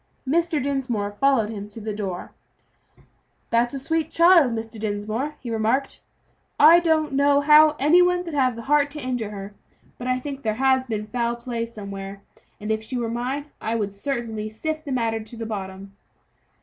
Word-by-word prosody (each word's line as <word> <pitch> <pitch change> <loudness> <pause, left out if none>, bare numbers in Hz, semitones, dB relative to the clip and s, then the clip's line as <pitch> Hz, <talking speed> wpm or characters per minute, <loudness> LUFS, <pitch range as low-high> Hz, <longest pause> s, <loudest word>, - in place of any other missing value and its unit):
Mr. 330 +2 +1
Dinsmore 255 -7 -2
followed 225 -1 +2
him 205 -2 -6
to 210 - -10
the 215 0 -4
door. 195 -4 -5 1.2
"That's 240 +3 +2
a - - -2
sweet 320 +3 -1
child, 335 -6 +5
Mr. 225 -1 -5
Dinsmore," 215 +7 -3
he 240 - -5
remarked. 225 +5 0 0.6
"I 325 +3 +8
don't 320 -4 +1
know 280 +1 +4
how 300 +1 +6
any 310 +6 +5
one 360 0 +2
could 335 -3 -7
have 260 -4 +2
the 230 - -8
heart 290 +2 +3
to 305 - -6
injure 250 -5 -3
her; 200 0 -8 0.5
but 250 - -5
I 255 0 +1
think 275 +1 -6
there 215 -3 -1
has 260 +1 +2
been 215 -3 -3
foul 235 +2 -1
play 235 -1 -4
somewhere, 200 -3 -8 0.4
and 210 +1 -3
if 220 0 0
she 250 +3 -5
were 230 -2 -2
mine 265 +5 -3
I 225 +1 -1
should 205 -2 -2
certainly 220 -1 -4
sift 310 +8 -4
the 280 - -5
matter 230 -3 0
to 220 +2 -9
the 225 - -5
bottom." 195 -2 -6
240 Hz, 185 wpm, -23 LUFS, 215-285 Hz, 1.2 s, I